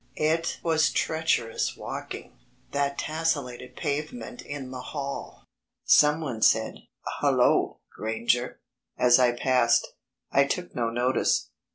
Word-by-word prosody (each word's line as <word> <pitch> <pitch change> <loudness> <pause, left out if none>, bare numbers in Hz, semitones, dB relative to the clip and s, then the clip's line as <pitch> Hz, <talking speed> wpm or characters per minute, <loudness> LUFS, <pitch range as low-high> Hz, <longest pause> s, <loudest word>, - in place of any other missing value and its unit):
It 160 +2 0
was 160 -1 +3
treacherous 160 -8 0
walking, - - -7 0.3
that 140 0 0
tessellated 140 -6 -2
pavement 140 -6 -4
in 140 -3 -7
the 130 -1 -6
hall. 140 +1 -6 0.4
Someone 150 -6 +3
said: - - +3 0.4
"Hullo, - - +2
Granger," 115 +3 -1 0.4
as 125 0 +5
I 125 -1 +5
passed. 120 -1 +2 0.4
I 140 - +5
took 180 +5 -3
no 115 -2 0
notice. 125 +3 +1
135 Hz, 105 wpm, -27 LUFS, 120-155 Hz, 0.4 s, as